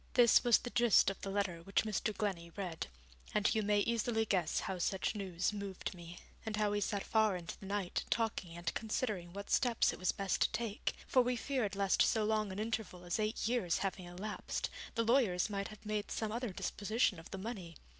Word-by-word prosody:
This 240 -2 +7
was 240 -3 +6
the 245 - -6
gist 240 -5 +5
of 195 - -10
the 195 - -4
letter 195 -4 -1
which 195 +3 +1
Mr. 215 0 0
Glennie 195 -6 -2
read, 180 -5 -4 0.5
and 210 0 +3
you 220 - +2
may 205 0 +3
easily 230 0 +1
guess 180 -6 +1
how 190 -1 -3
such 190 +4 0
news 190 -2 -1
moved 200 -2 -4
me, 175 -1 -10 0.3
and 220 -1 -2
how 210 -1 +1
we 205 0 0
sat 200 0 -1
far 220 -3 +3
into 170 -2 -6
the 195 - -9
night 200 -2 -1
talking 205 -7 -1
and 175 0 -2
considering 210 -5 -2
what 200 +2 -7
steps 240 -3 +3
it - - -9
was 185 - +2
best 195 -2 -1
to - - +4
take, 230 -3 -2
for 255 - +4
we 250 0 +1
feared 240 -6 -1
lest 195 -1 +2
so 220 - +4
long 215 -2 +1
an 190 - -6
interval 215 -4 -3
as 175 +4 -1
eight 215 0 0
years 230 -8 +1
having 185 -1 -3
elapsed, 190 +5 -4 0.2
the 230 - +2
lawyers 220 -6 +3
might 200 -1 -2
have 215 0 -12
made 210 -1 -2
some 220 -1 -2
other 240 +1 -2
disposition 205 +1 0
of 165 - -12
the 195 - -5
money. 190 -5 -6
205 Hz, 210 wpm, -35 LUFS, 185-220 Hz, 0.5 s, This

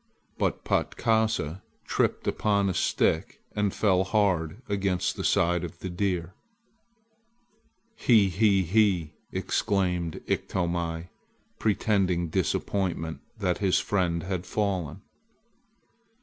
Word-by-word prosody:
But - - -1
Patkasa 110 -7 0 0.2
tripped - - 0
upon 100 -2 +1
a - - 0
stick - - +1 0.2
and 105 -1 +1
fell 95 -3 +2
hard 95 -3 +1
against 100 -2 0
the - - -4
side 85 0 +2
of 85 - -6
the 95 +1 -6
deer. 90 -2 -1 1.6
"He 110 - +4
he 100 +1 +3
he!" 90 -4 +2 0.2
exclaimed 90 -4 0
Iktomi, 85 -2 -2 0.5
pretending 95 -5 +1
disappointment 80 -3 -1 0.2
that 90 -4 0
his 95 -3 +3
friend 85 -4 0
had 95 0 -3
fallen. 95 -3 -2
95 Hz, 100 wpm, -27 LUFS, 85-100 Hz, 1.6 s, He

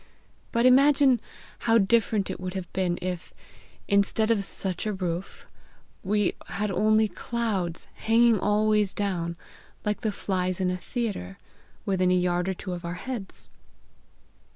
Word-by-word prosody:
But 235 +1 +2
imagine 270 0 +5 0.4
how 230 -1 +3
different 215 -1 +2
it - - -6
would 185 +1 -5
have 185 -2 -6
been 180 -2 0
if, 180 -1 -5 0.5
instead 200 +2 +2
of 210 -3 +2
such 190 +1 -3
a 210 - 0
roof, 180 -1 -4 0.6
we 205 0 +1
had 210 +1 -2
only 215 +3 +3
clouds, 205 -7 -2
hanging 230 -1 +3
always 210 0 +2
down, 175 -4 -2 0.5
like 210 0 -1
the 215 - 0
flies 185 -2 -2
in 185 -1 +1
a - - -1
theatre, 195 - -4 0.5
within 185 -2 +2
a 180 - +4
yard 180 0 +1
or 190 - -1
two 185 0 -5
of 175 0 -6
our 170 +1 -4
heads!" 230 0 -7
200 Hz, 145 wpm, -26 LUFS, 180-220 Hz, 0.6 s, imagine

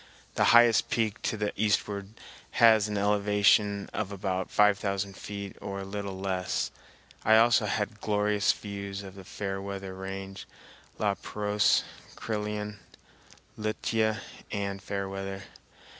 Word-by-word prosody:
The - - +2
highest 120 -1 +6
peak 110 0 0
to 110 - -1
the 105 -1 -1
eastward 100 -1 0 0.4
has 110 -2 +6
an 105 -1 -2
elevation 105 0 +3
of 105 -2 -2
about 95 -1 -2
five 105 -1 +4
thousand 100 -1 -2
feet 100 -1 -7
or 100 -1 -5
a - - -4
little 100 -1 -5
less. 95 -1 -1 0.5
I 110 - +6
also 115 -1 +5
had 105 +1 -2
glorious 105 -1 +2
views 100 -1 -6
of 95 -1 -9
the 95 -1 -11
Fairweather 95 0 -5
Range, 95 0 -7 0.5
La - - +1
Pérouse, 105 0 +1 0.3
Crillon, 105 -1 -4 0.8
Lituya, 110 0 0 0.3
and 100 -1 -3
Fairweather. 95 -1 -4
100 Hz, 125 wpm, -29 LUFS, 95-105 Hz, 0.8 s, highest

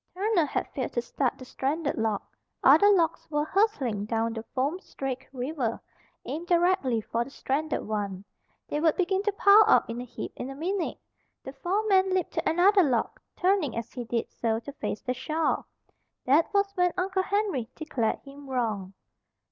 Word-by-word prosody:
Turner 385 -4 +2
had - - -2
failed 260 -3 -3
to 240 - 0
start 255 0 -1
the 255 - -10
stranded 285 +4 -2
log. 220 -3 -1 0.4
Other 410 - +7
logs 330 -4 +2
were 295 -1 0
hurtling 295 - +1
down 225 +1 -1
the 225 - -4
foam 280 +7 0
streaked 265 -7 -5
river, 255 -2 -2 0.5
aimed 330 +4 -5
directly 345 - +2
for 230 +2 -1
the 250 - -11
stranded 285 +3 -2
one. 200 -3 -3 0.4
They 295 - -2
would 320 0 +3
begin 380 +1 +1
to 415 +1 0
pile 405 +2 +7
up - - +5
in 235 +1 -4
a - - -5
heap 245 -1 -7
in 255 - -5
a 270 - -7
minute. 355 +5 -2 0.5
The 265 - -8
foreman 380 +2 +2
leaped 370 - 0
to - - 0
another 380 +4 +5
log, 255 -9 0 0.2
turning 360 - +1
as 230 0 -5
he 245 - -4
did 230 0 -1
so 225 -1 -1
to 285 - -8
face 245 - -4
the 250 - -1
shore. 310 +5 -1 0.6
That 290 +6 +3
was 400 -1 +2
when 360 -1 +2
Uncle 375 +1 0
Henry 390 - -1
declared 250 -8 -1
him 280 0 -12
wrong. 215 -7 -2
290 Hz, 180 wpm, -27 LUFS, 240-370 Hz, 0.6 s, Other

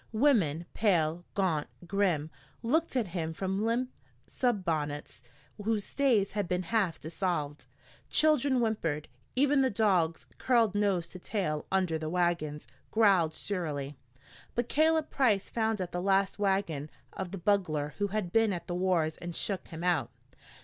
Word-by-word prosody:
Women, 210 - +3
pale, 175 -5 +1
gaunt, 170 -7 +1 0.2
grim, 175 -5 0 0.3
looked 315 +6 +1
at 230 -7 0
him 165 -2 -3
from 190 +4 -2
limp 240 +3 0 0.3
sunbonnets 165 - -2 0.4
whose 215 -1 0
stays 240 -8 +2
had 205 -3 -2
been 180 +1 -1
half 190 -5 0
dissolved. 160 -3 -3 0.4
Children 285 -4 +3
whimpered. 165 -10 -1 0.3
Even 280 +1 +4
the 260 - +3
dogs, 190 -7 +1
curled 235 -5 +3
nose 195 -5 +1
to 185 - -8
tail 175 -7 -2
under 185 -4 +1
the 155 0 -3
wagons, 170 -4 0 0.2
growled 195 -8 +3
surlily. 150 -8 -3 0.6
But 240 0 -1
Caleb 315 0 +2
Price 220 -8 +2
found 220 -2 0
at 180 -2 -4
last 195 +2 +1
the - - -9
wagon 190 -7 0 0.2
of 190 -2 -4
the 195 - -6
bugler 165 -6 0
who 205 - +2
had 200 -3 -3
been 225 -2 +4
at 175 - -5
the 175 - -4
wars 175 -3 +1
and 175 -1 -6
shook 195 -3 -2
him 165 0 -7
out. 165 -10 +1
190 Hz, 150 wpm, -30 LUFS, 165-220 Hz, 0.6 s, Even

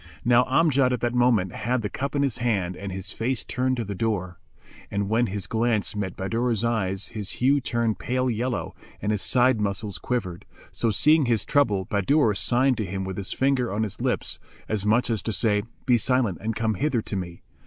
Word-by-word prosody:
Now 120 +1 +5
Amjad 135 -2 +3
at 125 - -2
that 120 0 0
moment 120 -7 +3
had 120 +2 -1
the - - 0
cup 140 +6 -4
in 140 - +2
his 130 -3 -1
hand 100 -7 0
and 100 +1 -6
his 95 0 -4
face 125 +2 -2
turned 130 +1 -1
to 115 - -2
the 100 - -4
door; 95 -4 -2 0.5
and 100 0 -2
when 115 +2 +2
his 100 0 -3
glance 110 -1 0
met 95 -4 -3
Bahadur's 115 +3 -1
eyes 100 -5 -1
his 105 -3 -3
hue 140 +3 +2
turned 115 -3 -1
pale 130 +1 -1
yellow 120 +1 -2 0.3
and 105 - -1
his 105 -2 -1
side 125 -3 +3
muscles 100 0 -2
quivered, 95 -9 -3 0.3
so 115 - 0
seeing 150 +6 +4
his 115 -4 +1
trouble 105 -10 +2
Bahadur 105 - +2
signed 125 +5 +2
to 110 - -1
him 95 +1 -3
with 95 -1 -5
his 100 -2 -3
finger 130 -4 +1
on 105 +2 0
his 105 - -5
lips, - - -1 0.3
as 105 -1 -1
much 115 +3 +3
as 110 - 0
to 115 - -3
say, 105 -1 +1 0.2
"Be 120 -2 +4
silent 120 - +1
and 110 +1 -2
come 110 0 0
hither 120 +1 0
to - - -5
me." 85 -2 -6
115 Hz, 205 wpm, -25 LUFS, 100-125 Hz, 0.5 s, Now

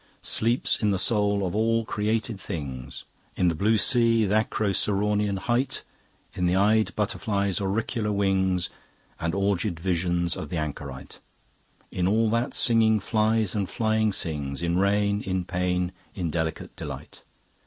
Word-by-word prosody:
Sleeps 115 +3 +2
in 105 - +2
the 100 - +1
soul 100 -1 +2
of 90 - -3
all 115 +1 +1
created 110 0 -1
things; 65 -9 -6 0.3
In 90 - +3
the - - 0
blue 105 +7 +2
sea, 115 -1 +3
th' 100 - -2
Acroceraunian 105 -1 +1
height, 120 +6 -1 0.5
In 90 - 0
the 90 - +2
eyed 105 +3 +3
butterfly's 100 -2 -1
auricular 105 +2 -1
wings 95 -3 +1 0.5
And 85 +2 -1
orgied 100 -3 0
visions 85 -1 0
of - - -6
the 85 - -3
anchorite; 70 -3 -6 0.7
In 90 0 0
all 110 +2 +2
that 115 +3 0
singing 110 -2 +4
flies 110 -2 +1
and 100 -4 -1
flying 110 +3 +1
sings, 75 -5 -2
In 85 +1 +1
rain, 100 +1 +2
in 95 -2 -2
pain, 90 0 -1 0.2
in 85 -5 -2
delicate 80 -1 -3
delight. - - -8
100 Hz, 145 wpm, -26 LUFS, 90-110 Hz, 0.7 s, singing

